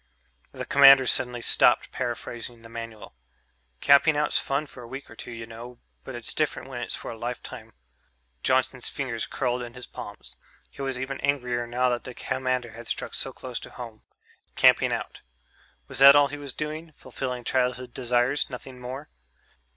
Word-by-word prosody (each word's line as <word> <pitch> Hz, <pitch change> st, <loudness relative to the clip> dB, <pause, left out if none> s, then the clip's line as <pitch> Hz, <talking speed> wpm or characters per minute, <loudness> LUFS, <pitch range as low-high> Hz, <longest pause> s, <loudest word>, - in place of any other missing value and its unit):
The -, -, -6 dB
commander 140 Hz, -1 st, +8 dB
suddenly 125 Hz, -1 st, 0 dB
stopped -, -, +4 dB
paraphrasing 120 Hz, 0 st, -4 dB
the 115 Hz, -, -12 dB
Manual. 115 Hz, -2 st, -8 dB, 0.7 s
"Camping 145 Hz, +2 st, +6 dB
out's 150 Hz, 0 st, +2 dB
fun 140 Hz, +2 st, -1 dB
for 130 Hz, -, -12 dB
a 120 Hz, -, -9 dB
week 135 Hz, +1 st, -8 dB
or -, -, -11 dB
two, -, -, -9 dB
you 115 Hz, -1 st, -6 dB
know, 115 Hz, +2 st, -10 dB, 0.3 s
but 130 Hz, -, -7 dB
it's 120 Hz, -1 st, -4 dB
different 155 Hz, -3 st, -1 dB
when 120 Hz, -2 st, -5 dB
it's 120 Hz, -, -3 dB
for -, -, -6 dB
a 115 Hz, -, -8 dB
lifetime." 120 Hz, +1 st, -6 dB, 0.7 s
Johnson's 130 Hz, -, +1 dB
fingers 125 Hz, -5 st, -3 dB
curled 125 Hz, -2 st, -1 dB
in 120 Hz, 0 st, -7 dB
his 125 Hz, -, -7 dB
palms... -, -, -9 dB, 0.3 s
he -, -, -9 dB
was 135 Hz, -2 st, -1 dB
even 130 Hz, +1 st, -4 dB
angrier 125 Hz, -4 st, 0 dB
now 125 Hz, +2 st, +1 dB
that 120 Hz, -1 st, -1 dB
the 125 Hz, -2 st, -8 dB
commander 130 Hz, -2 st, -1 dB
had 115 Hz, +1 st, -10 dB
struck -, -, -3 dB
so -, -, -2 dB
close -, -, -6 dB
to -, -, -9 dB
home. 115 Hz, -3 st, -9 dB, 0.5 s
Camping -, -, +5 dB
out... -, -, -4 dB, 0.7 s
was -, -, -5 dB
that 140 Hz, +1 st, +10 dB
all 145 Hz, -1 st, +6 dB
he 145 Hz, -, -5 dB
was 140 Hz, -2 st, -6 dB
doing 155 Hz, +3 st, -5 dB
fulfilling 125 Hz, -2 st, -5 dB
childhood 125 Hz, 0 st, 0 dB
desires, 125 Hz, +2 st, +1 dB
nothing 125 Hz, 0 st, -8 dB
more? 130 Hz, +4 st, -7 dB
125 Hz, 175 wpm, -26 LUFS, 120-135 Hz, 0.7 s, that